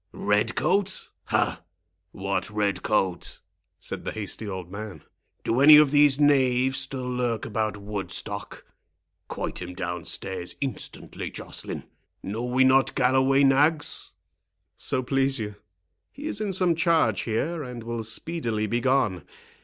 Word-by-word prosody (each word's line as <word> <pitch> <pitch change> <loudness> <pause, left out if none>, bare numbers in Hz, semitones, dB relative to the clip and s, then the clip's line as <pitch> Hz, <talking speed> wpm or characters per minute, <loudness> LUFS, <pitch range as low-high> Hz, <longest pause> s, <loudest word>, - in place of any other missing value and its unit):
"Red 105 +3 +1
coat—ha! 190 +3 -1 0.5
what 100 +1 -2
red 105 -3 -1
coat?" 95 -5 -1 0.4
said - - -5
the - - -3
hasty 110 0 -5
old 95 -3 -6
man. 105 0 -7 0.4
"Do 120 +3 +1
any 150 +1 +10
of 150 -2 +6
these 145 -1 +5
knaves 130 -3 +3
still 135 -1 -4
lurk 125 -3 -1
about 110 -1 -2
Woodstock?—Quoit 100 -2 -7
him 90 0 -7
down 90 -2 -4
stairs 95 -2 -3
instantly, 135 -2 -5
Joceline.—Know 110 +4 -7
we 125 +2 +3
not 130 +1 +4
Galloway 130 +2 +3
nags?" 145 +3 +2 0.6
"So 130 - -1
please 135 +1 +1
you, 105 -2 -5 0.5
he 285 +3 -9
is 220 -9 -3
in 210 -2 -1
some 180 -2 +3
charge 165 - +2
here, 150 +9 -2
and 125 -4 -7
will 115 0 -4
speedily 115 -1 -2
be 120 +3 0
gone. 115 - +1
125 Hz, 130 wpm, -26 LUFS, 105-140 Hz, 0.6 s, any